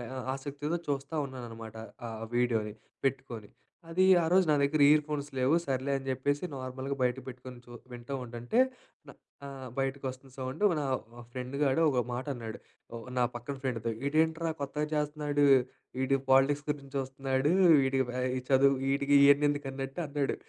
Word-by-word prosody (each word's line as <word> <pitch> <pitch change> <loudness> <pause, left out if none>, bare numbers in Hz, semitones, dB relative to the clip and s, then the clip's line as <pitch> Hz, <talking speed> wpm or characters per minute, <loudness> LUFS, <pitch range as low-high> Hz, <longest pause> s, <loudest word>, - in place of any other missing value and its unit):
ఆ - - -4 0.2
ఆసక్తితో 145 +4 -4
చూస్తా 140 +2 -2
ఉన్నాననమాట. 115 -4 -8 0.3
ఆ - - -4 0.3
వీడియోని, 110 -4 +1 0.3
పెట్టుకొని. 130 -5 -3 0.4
అది 185 +3 +3 0.2
ఆరోజు 180 +3 +4
నా - - +5
దగ్గర 145 +1 +2
ఇయర్ 150 0 +6
ఫోన్స్ 145 -1 -4
లేవు. 130 +5 +3
సర్లే 135 +1 -1
అని 135 - -8
చెప్పేసి 145 +4 -1
నార్మల్‌గా 130 +1 -4
బయట 125 0 +2
పెట్టుకొని 125 0 -9
చూ 120 - -14 0.2
వింటూ 120 +3 -7
ఉంటంటే 120 - -2 0.5
న - - -9 0.3
ఆహ్, 135 -2 -8
బయటకి 135 0 -2
వస్తుంది 130 0 -11
సౌండ్. 130 +7 -5 0.2
నా 145 - -2 0.5
ఫ్రెండ్ 125 +2 -5
గాడు 135 +3 +2
ఒక 125 -3 +1
మాట 125 +3 -3
అన్నాడు 115 -3 -7 0.4
ఒ - - -4 0.2
నా 125 - +4
పక్కన 120 +4 -5
ఫ్రెండ్‌తో, 115 -3 -2 0.2
"ఈడేంట్రా 160 +2 +1
కొత్తగా 150 +2 -2
చేస్తున్నాడు, 150 -1 0 0.6
ఈడు 135 +1 +2
పాలిటిక్స్ 140 +2 +4
గురించి 140 -2 -3
చూస్తున్నాడు, 135 +1 -1 0.3
వీడికి 135 -1 +1
బ - - -3 0.3
ఈ - - -1
చదువు 135 +1 +5
వీటికి 140 +1 +2
ఇయన్ని 145 +1 +6
ఎందుకు" 145 -1 -2
అన్నట్టు 135 +5 -5
అన్నాడు. 145 -1 -1
135 Hz, 160 wpm, -30 LUFS, 130-145 Hz, 0.6 s, ఇయర్